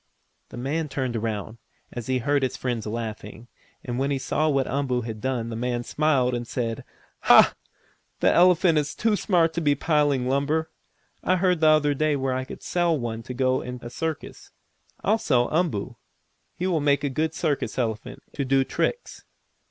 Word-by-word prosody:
The - - -10
man 150 +5 -2
turned 130 -3 -2
around, 110 0 -4 0.3
as 120 -2 -6
he 130 0 +1
heard 140 +3 +1
his 130 - -1
friends 120 -4 -3
laughing, 110 0 -6 0.4
and 120 0 -3
when 135 +1 0
he 140 - 0
saw 155 +4 0
what 135 -2 +1
Umboo 130 -2 -1
had 110 -2 -6
done 125 -3 -2
the 115 - -5
man 120 +1 -2
smiled 135 -3 +1
and 120 -1 -3
said: 115 -3 -3 0.4
"Ha! - - +7 0.7
That - - +3
elephant 175 -2 +5
is 145 -1 -3
too 225 -1 +1
smart 170 -5 +2
to 170 - -2
be 145 -2 +3
piling 145 -4 +1
lumber. 150 +4 0 0.5
I 185 - +3
heard 180 -2 +2
the 160 - +4
other 155 -1 +4
day 155 +1 +1
where 135 -1 -1
I 130 0 -2
could - - -10
sell 175 -2 +1
one 115 -3 -4
to 125 +2 -8
go 130 0 +1
in 125 0 -6
a 120 - -7
circus. 160 +3 -5 0.5
I'll 215 +3 +2
sell 125 - +2
Umboo! 130 - -1 0.6
He 180 - -3
will 175 -5 +1
make 140 -1 +2
a - - +1
good 155 +4 -1
circus 150 -5 -1
elephant, 115 -2 -3
to 140 - -2
do 135 0 +3
tricks." 480 - -3
135 Hz, 185 wpm, -25 LUFS, 120-155 Hz, 0.7 s, Ha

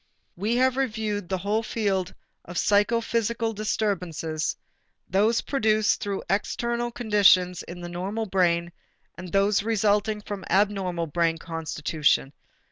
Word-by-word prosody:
We 210 +6 -1
have 260 +1 +2
reviewed 215 -7 -2
the 190 - 0
whole 205 +4 0
field 200 -5 -1 0.3
of 175 0 -8
psychophysical 230 +2 +1
disturbances, 180 -7 -2 0.5
those 210 +5 +2
produced 215 -5 +1
through 200 -1 -3
external 235 +5 -1
conditions 200 -6 +4
in 175 +1 -9
the 175 - -6
normal 190 +6 -3
brain 175 -3 +1 0.4
and 180 -1 -9
those 200 +1 +3
resulting 210 -1 +1
from 205 -2 -6
abnormal 190 -4 +1
brain 165 +1 0
constitution. 155 -3 -1
200 Hz, 120 wpm, -25 LUFS, 175-220 Hz, 0.5 s, conditions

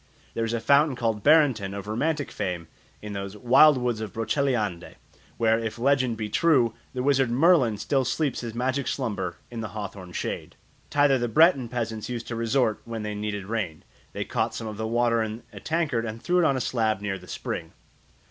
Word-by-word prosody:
There 115 - -1
is 115 0 -1
a 115 - 0
fountain 140 +4 +4
called 115 -3 -1
Barenton, 130 -10 +4
of 100 -1 -6
romantic 145 +8 -1
fame, 85 -3 -3 0.4
in 105 -1 -6
those 100 +1 -5
"wild 135 +6 +6
woods 120 -3 -1
of 110 -3 -5
Broceliande," 110 - -1 0.4
where, 115 0 +3
if 110 -1 -4
legend 130 -2 +2
be 110 -1 -3
true, 125 -1 +3 0.2
the 125 - -1
wizard 135 -2 +3
Merlin 130 - +4
still 135 +5 0
sleeps 140 +3 -1
his 115 -2 -6
magic 130 +2 -1
slumber 105 -9 -2
in 115 -1 -5
the 110 - -3
hawthorn 100 -3 -7
shade. - - -4 0.3
Thither 145 -2 +3
the 120 - 0
Breton 140 -2 +4
peasants 115 -3 -3
used 120 -2 -5
to 120 - -3
resort 115 -1 +1
when 115 -2 -5
they 105 0 -3
needed 105 -1 -4
rain. 100 -7 -3 0.3
They - - -3
caught - - -1
some 115 - -5
of 105 -2 -6
the 110 0 -2
water 115 0 +2
in 110 +1 -4
a - - -8
tankard 155 -8 -1
and 110 0 -5
threw 180 +8 +1
it 175 - +4
on 135 -4 +2
a - - -1
slab 110 -5 0
near 95 -2 -3
the 90 - -15
spring. - - -5
115 Hz, 200 wpm, -26 LUFS, 105-135 Hz, 0.4 s, wild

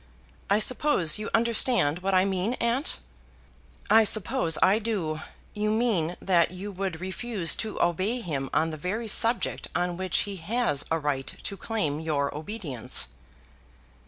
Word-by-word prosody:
I 200 - +4
suppose 215 - +2
you 215 - -4
understand 225 - +2
what 190 +1 0
I 185 +1 +4
mean, 195 +5 -1
aunt?" 245 +6 0 0.9
"I 225 0 +6
suppose 175 -6 +2
I 200 +4 +4
do. 190 -9 -2 0.3
You 210 0 -1
mean 215 -7 0
that 175 -3 +3
you 185 +3 -7
would 190 -3 -4
refuse 190 0 0
to 220 -1 -4
obey 185 +8 +1
him 140 - -3
on 160 +1 +1
the 155 - -6
very 205 +9 -3
subject 230 +3 +2
on 175 0 -1
which 185 -2 0
he 200 -1 -4
has 190 - 0
a 165 - +1
right 145 -3 -2
to 200 - -3
claim 195 -9 -2
your 145 -3 -1
obedience." 155 - -2
190 Hz, 150 wpm, -27 LUFS, 160-220 Hz, 0.9 s, I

